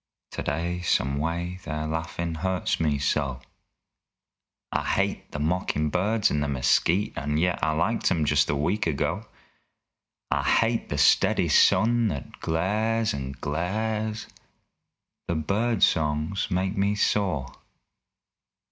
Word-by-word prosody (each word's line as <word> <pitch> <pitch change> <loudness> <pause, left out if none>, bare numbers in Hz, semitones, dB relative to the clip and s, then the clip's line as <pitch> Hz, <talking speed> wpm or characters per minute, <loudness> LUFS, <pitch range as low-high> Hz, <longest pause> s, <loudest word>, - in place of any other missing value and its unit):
Today, 85 +5 -2
some 70 -5 +1
way, 85 +3 -3
their 75 0 -3
laughin' 80 +1 -3
hurts 95 -2 -1
me 75 -3 +1
so. 70 -2 -1 1.3
I - - 0
hate - - -1
the - - -5
mockin' 75 -1 0
birds 105 +4 +1
in 75 - 0
the 75 - 0
mesquite 70 +8 +2
And 75 +1 -1
yet 90 +1 +1
I 80 - +2
liked 85 +9 +1
'em 80 -3 +1
just 75 -1 +2
a - - +1
week 90 +8 0
ago. 75 -4 -2 1.0
I - - +2
hate 115 0 +1
the 75 - -2
steady 70 - +4
sun 120 +1 +4
that 70 -9 -5
glares, 105 +7 0
and 70 -1 -6
glares! 110 +8 -2 1.0
The 85 - -1
bird 105 +8 0
songs 75 +5 +1
make 95 +2 -1
me 100 +1 +1
sore. 90 -11 0
85 Hz, 130 wpm, -26 LUFS, 75-100 Hz, 1.3 s, steady